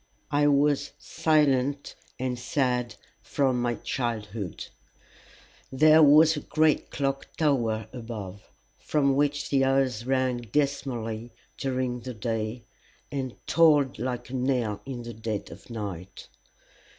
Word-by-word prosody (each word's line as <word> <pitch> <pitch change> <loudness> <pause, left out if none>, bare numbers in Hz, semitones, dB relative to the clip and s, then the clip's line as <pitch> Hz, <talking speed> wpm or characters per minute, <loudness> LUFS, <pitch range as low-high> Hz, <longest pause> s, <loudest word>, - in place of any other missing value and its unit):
I 145 0 +3
was 145 0 +2
silent 140 -3 +1 0.2
and 125 -1 -3
sad 125 -2 -1 0.3
from 130 -3 0
my 120 -1 0
childhood. 110 - -4 1.1
There 155 +4 +6
was 155 +2 +7
a - - -2
great 155 0 +1
clock 135 -1 -2
tower 115 -8 +1
above, 110 -5 -8 0.3
from 140 -3 +1
which 145 0 0
the 135 -1 +3
hours 130 -3 +1
rang 130 -2 +1
dismally 120 -2 -2 0.2
during 130 -2 -2
the 125 0 -7
day, 110 +1 -3 0.5
and 130 -3 -4
tolled 150 -7 +4
like 125 0 -4
a - - -4
knell 125 -5 0
in 125 -3 -5
the 120 0 -7
dead 110 -1 -4
of - - -13
night. 100 -5 -7
130 Hz, 120 wpm, -27 LUFS, 115-140 Hz, 1.1 s, was